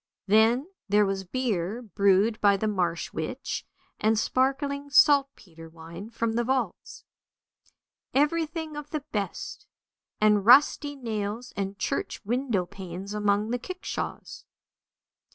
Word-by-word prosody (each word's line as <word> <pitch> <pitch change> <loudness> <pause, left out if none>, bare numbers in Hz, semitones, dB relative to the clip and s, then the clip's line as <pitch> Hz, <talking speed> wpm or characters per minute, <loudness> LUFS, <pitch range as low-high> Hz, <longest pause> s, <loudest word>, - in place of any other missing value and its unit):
Then 220 +6 +4 0.2
there 205 +1 +4
was 195 -1 -2
beer 215 0 -2
brewed 200 +1 +2
by 200 -1 +5
the 215 - -1
marsh 180 -5 -1
witch, - - -4 0.3
and 220 +1 +2
sparkling 280 +4 0
saltpetre 275 - +3
wine 165 +5 -10
from 230 -1 -2
the 240 +1 +1
vaults. 260 +2 -3 1.1
Everything 315 +2 0
of 295 0 -7
the 300 -2 -4
best, 200 -4 -4 0.5
and 210 -1 +4
rusty 285 +5 +5
nails 225 -2 -4
and 195 0 -3
church - - -2
window 235 -4 0
panes 185 +2 -8
among 210 +1 +1
the 245 - -1
kickshaws. 370 +8 -6
220 Hz, 115 wpm, -27 LUFS, 200-265 Hz, 1.1 s, by